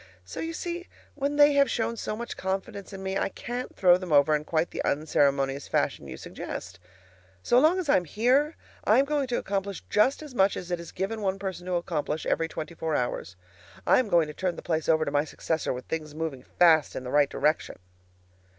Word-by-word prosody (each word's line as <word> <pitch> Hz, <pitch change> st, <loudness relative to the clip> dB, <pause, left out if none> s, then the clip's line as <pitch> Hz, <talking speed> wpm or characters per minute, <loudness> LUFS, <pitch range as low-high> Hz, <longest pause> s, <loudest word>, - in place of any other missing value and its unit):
So 90 Hz, -, -8 dB
you 330 Hz, 0 st, -3 dB
see, 345 Hz, +2 st, -5 dB, 0.3 s
when 285 Hz, 0 st, -2 dB
they 290 Hz, 0 st, +6 dB
have 280 Hz, -1 st, +4 dB
shown 230 Hz, 0 st, -1 dB
so 215 Hz, -, -4 dB
much 235 Hz, +2 st, -6 dB
confidence 190 Hz, +1 st, -4 dB
in 195 Hz, -1 st, -8 dB
me, 190 Hz, 0 st, -1 dB
I -, -, 0 dB
can't 245 Hz, +5 st, -6 dB
throw 180 Hz, -2 st, +6 dB
them 185 Hz, -2 st, -7 dB
over 150 Hz, +1 st, +5 dB
in 150 Hz, 0 st, -3 dB
quite 160 Hz, +1 st, 0 dB
the -, -, -3 dB
unceremonious 140 Hz, -2 st, +1 dB
fashion -, -, -1 dB
you -, -, -7 dB
suggest. -, -, -7 dB, 0.6 s
So 245 Hz, -, +4 dB
long 315 Hz, +6 st, +4 dB
as 365 Hz, -4 st, -2 dB
I 285 Hz, -, +5 dB
am 180 Hz, -, -1 dB
here, 255 Hz, -, +2 dB, 0.3 s
I -, -, +4 dB
am 270 Hz, -, +4 dB
going 285 Hz, -2 st, 0 dB
to 245 Hz, -, -1 dB
accomplish 195 Hz, -1 st, -3 dB
just 260 Hz, +8 st, +3 dB
as 295 Hz, -4 st, -10 dB
much 195 Hz, -4 st, +3 dB
as 180 Hz, 0 st, -7 dB
it 175 Hz, -, -1 dB
is 170 Hz, -, -9 dB
given 205 Hz, +4 st, -3 dB
one 195 Hz, -1 st, 0 dB
person 190 Hz, -2 st, -5 dB
to 185 Hz, -, -2 dB
accomplish 160 Hz, -3 st, -2 dB
every 165 Hz, -, +1 dB
twenty 165 Hz, 0 st, -6 dB
four 160 Hz, -2 st, -2 dB
hours. 110 Hz, -6 st, -2 dB, 0.5 s
I -, -, +5 dB
am 250 Hz, -5 st, -1 dB
going 170 Hz, -3 st, +4 dB
to 150 Hz, -, -8 dB
turn 180 Hz, 0 st, -2 dB
the -, -, -9 dB
place 160 Hz, -1 st, -1 dB
over 160 Hz, -1 st, +4 dB
to -, -, -2 dB
my 145 Hz, 0 st, +2 dB
successor 160 Hz, +1 st, -2 dB
with 125 Hz, 0 st, -5 dB
things 155 Hz, -2 st, -5 dB
moving 155 Hz, -5 st, -4 dB
fast 160 Hz, +1 st, +3 dB
in -, -, -4 dB
the 125 Hz, -, -5 dB
right 145 Hz, -1 st, +4 dB
direction. 150 Hz, +2 st, 0 dB
180 Hz, 225 wpm, -27 LUFS, 155-235 Hz, 0.6 s, they